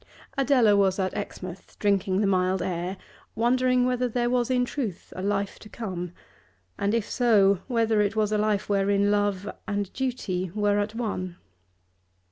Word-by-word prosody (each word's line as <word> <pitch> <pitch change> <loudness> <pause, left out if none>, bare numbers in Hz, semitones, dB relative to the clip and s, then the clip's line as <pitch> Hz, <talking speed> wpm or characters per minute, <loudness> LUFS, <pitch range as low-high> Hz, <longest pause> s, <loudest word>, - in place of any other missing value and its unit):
Adela 260 -6 +4
was 195 -2 +3
at 185 -2 -1
Exmouth, 185 -3 -7
drinking 195 -1 +1
the - - +2
mild 185 -1 +1
air, 180 +1 -3 0.4
wondering 250 +1 +3
whether 250 0 0
there 240 +1 0
was 245 -1 +1
in 250 -1 +2
truth 235 - -5
a 185 - -5
life 200 0 -1
to 210 - -13
come, 185 -6 -5 0.7
and, 200 +3 +1
if 230 -2 -1
so, 200 -6 +4
whether 225 -4 +2
it 205 +1 0
was 215 -1 +1
a 215 - +2
life 210 -1 +1
wherein 200 0 +2
Love 205 -1 0 0.2
and 205 -2 -2
Duty 200 -9 -2
were 205 -1 +2
at 210 +2 -2
one. 185 -6 -3
205 Hz, 160 wpm, -26 LUFS, 195-235 Hz, 0.7 s, Adela